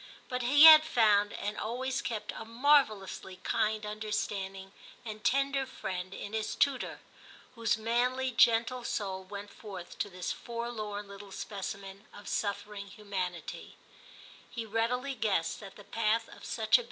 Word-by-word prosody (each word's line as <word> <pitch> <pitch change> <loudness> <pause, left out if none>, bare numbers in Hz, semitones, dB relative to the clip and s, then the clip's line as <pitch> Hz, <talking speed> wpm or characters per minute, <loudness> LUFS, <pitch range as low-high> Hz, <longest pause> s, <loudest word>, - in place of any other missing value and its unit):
But 250 0 -2
he 280 +5 +6
had 315 -1 +12
found 215 -9 +4
and 210 +1 -4
always 255 +4 -2
kept 225 -3 -3
a - - -6
marvellously 225 -6 +2
kind 215 0 0
understanding 205 -2 -3 0.3
and 215 -1 -7
tender 275 0 +2
friend 185 -6 -5
in 205 +2 -7
his 220 -1 -2
tutor, 275 -2 0 0.5
whose 230 -3 +1
manly 250 +4 +1
gentle 235 +1 +4
soul 190 -4 -3
went 200 +2 -8
forth 190 -5 -9
to 205 - -1
this 180 -1 -4
forlorn 220 -3 -5
little 200 0 -11
specimen 195 0 -6
of 205 - -11
suffering 200 0 -3
humanity; 190 -4 -5 0.7
he 230 -2 -5
readily 235 +5 0
guessed 205 -9 0
that 195 -2 -10
the 205 - -12
path 225 +2 0
of - - -12
such - - -6
a - - -8
ii6 - - -2
TIM 220 -2 -4
CHAP. - - +9
215 Hz, 155 wpm, -31 LUFS, 200-240 Hz, 0.7 s, had